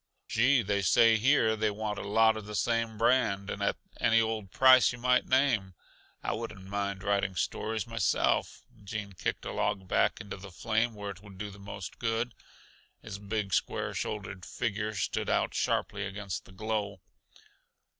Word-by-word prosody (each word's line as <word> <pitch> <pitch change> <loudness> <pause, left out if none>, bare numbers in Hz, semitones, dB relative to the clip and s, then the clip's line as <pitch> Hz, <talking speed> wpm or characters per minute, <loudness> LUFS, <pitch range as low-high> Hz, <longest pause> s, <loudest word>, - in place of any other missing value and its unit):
"Gee! 125 +2 +3
they 100 0 0
say 110 +5 +5
here 115 -2 +3
they 110 0 +1
want 105 0 -3
a - - -6
lot 110 +2 +5
the 105 +1 -7
same 115 -1 0
brand, 115 -4 +2
and 100 - -5
at 100 - +1 0.2
any 115 -1 +4
old 110 -3 -1
price 130 +4 +6
yuh 125 - -7
might 125 +1 +2
name. 125 -9 +2 0.5
I - - -1
wouldn't 110 -4 -6
mind 100 -1 -3
writing 100 -2 0
stories 110 +6 -2
myself." 115 -4 0 0.2
Gene 100 -1 -5
kicked 90 - -3
a - - -3
log 95 -2 -1
back - - +2
into 100 - -7
the 100 +1 -10
flame 110 +5 0
where 100 -1 -5
it 95 -1 -12
would 100 -2 -13
do 105 +1 -5
the 100 - -13
most 100 -1 -8
good. 115 +1 -1 0.7
His 100 - -7
big, 105 -1 -3
square - - 0
shouldered 100 -3 -4
figure 110 +1 -3
stood 95 - -1
out - - +1
sharply - - 0
against 100 -1 -5
the - - -15
glow. 100 -1 -3
105 Hz, 170 wpm, -30 LUFS, 100-115 Hz, 0.7 s, price